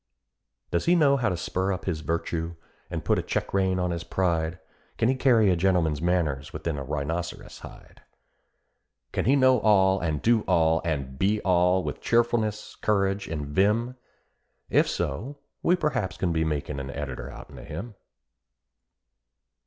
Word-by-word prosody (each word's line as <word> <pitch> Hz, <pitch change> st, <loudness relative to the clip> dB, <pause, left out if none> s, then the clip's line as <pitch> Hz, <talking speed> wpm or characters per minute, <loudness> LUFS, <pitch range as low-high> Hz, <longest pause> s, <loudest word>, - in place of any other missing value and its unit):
Does 85 Hz, -, 0 dB
he 175 Hz, -, +4 dB
know 145 Hz, -5 st, +4 dB
how 120 Hz, -6 st, +1 dB
to 90 Hz, -, -2 dB
spur 95 Hz, +3 st, -1 dB
up 95 Hz, -, -4 dB
his 85 Hz, -5 st, -1 dB
virtue, 85 Hz, +2 st, -2 dB, 0.3 s
and -, -, -5 dB
put -, -, +2 dB
a -, -, 0 dB
check -, -, -3 dB
rein 95 Hz, -1 st, +2 dB
on 90 Hz, -1 st, 0 dB
his 85 Hz, -1 st, -3 dB
pride? 85 Hz, -2 st, -1 dB, 0.4 s
Can 115 Hz, -, +2 dB
he -, -, +4 dB
carry 120 Hz, -6 st, +4 dB
a -, -, +3 dB
gentleman's 85 Hz, -5 st, +1 dB
manners 80 Hz, -6 st, 0 dB
within 85 Hz, -2 st, -3 dB
a -, -, -4 dB
rhinoceros' 75 Hz, +5 st, -4 dB
hide? -, -, -13 dB, 1.1 s
Can -, -, -1 dB
he 135 Hz, +5 st, +4 dB
know 130 Hz, -2 st, +5 dB
all, 95 Hz, -3 st, +4 dB
and 80 Hz, -4 st, -1 dB
do 115 Hz, +3 st, +3 dB
all, 80 Hz, -1 st, +3 dB
and 70 Hz, -5 st, -3 dB
be 105 Hz, +2 st, +2 dB
all, 90 Hz, 0 st, +3 dB
with -, -, -5 dB
cheerfulness, 115 Hz, -3 st, 0 dB
courage, 100 Hz, -1 st, 0 dB
and 75 Hz, -3 st, -4 dB
vim? 105 Hz, -, +1 dB, 0.8 s
If -, -, +4 dB
so, 125 Hz, -, -3 dB, 0.2 s
we 175 Hz, -, +3 dB
perhaps 150 Hz, -, -1 dB
can 85 Hz, -3 st, 0 dB
be 80 Hz, 0 st, +1 dB
makin 75 Hz, -2 st, -2 dB
an 70 Hz, 0 st, -6 dB
editor 70 Hz, -3 st, -5 dB
'outen -, -, -11 dB
of -, -, -11 dB
him.'" 120 Hz, -1 st, -6 dB
90 Hz, 165 wpm, -26 LUFS, 80-110 Hz, 1.1 s, know